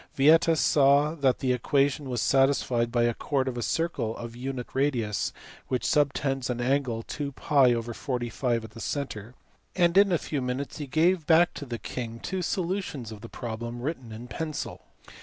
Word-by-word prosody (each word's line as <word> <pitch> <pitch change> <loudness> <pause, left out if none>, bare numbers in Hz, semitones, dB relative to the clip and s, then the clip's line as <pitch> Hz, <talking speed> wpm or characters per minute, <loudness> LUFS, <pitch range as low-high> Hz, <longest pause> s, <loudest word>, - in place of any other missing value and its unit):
Vieta 160 +4 +5
saw 145 +1 +4
that 140 -5 +2
the 130 -1 +1
equation 140 +2 +1
was 120 -3 -1
satisfied 135 -3 +2
by 120 -1 +2
the 120 0 +2
chord 135 +2 -1
of 130 - -2
a 120 - -3
circle 130 -6 -1
(of 115 0 -7
unit 130 0 -4
radius) 125 -7 0 0.4
which 125 -2 -1
subtends 135 -3 +1
an 125 -1 -2
angle 125 -2 0
2?r/45 125 -3 0
at 110 - -9
the - - -11
centre, 125 -5 -4 0.4
and 175 -1 +3
in 200 -1 +5
a 175 - +4
few 145 -2 -3
minutes 130 +4 -3
he 145 - -4
gave 160 +3 +2
back 170 +1 +5
to 145 - -7
the 120 -1 -4
king 115 -1 -6
two 190 +7 -3
solutions 175 - -2
of 105 -2 -9
the 115 - -9
problem 120 +1 -5
written 130 -3 -4
in 115 +3 -8
pencil. 155 +3 -5
135 Hz, 170 wpm, -27 LUFS, 120-150 Hz, 0.4 s, Vieta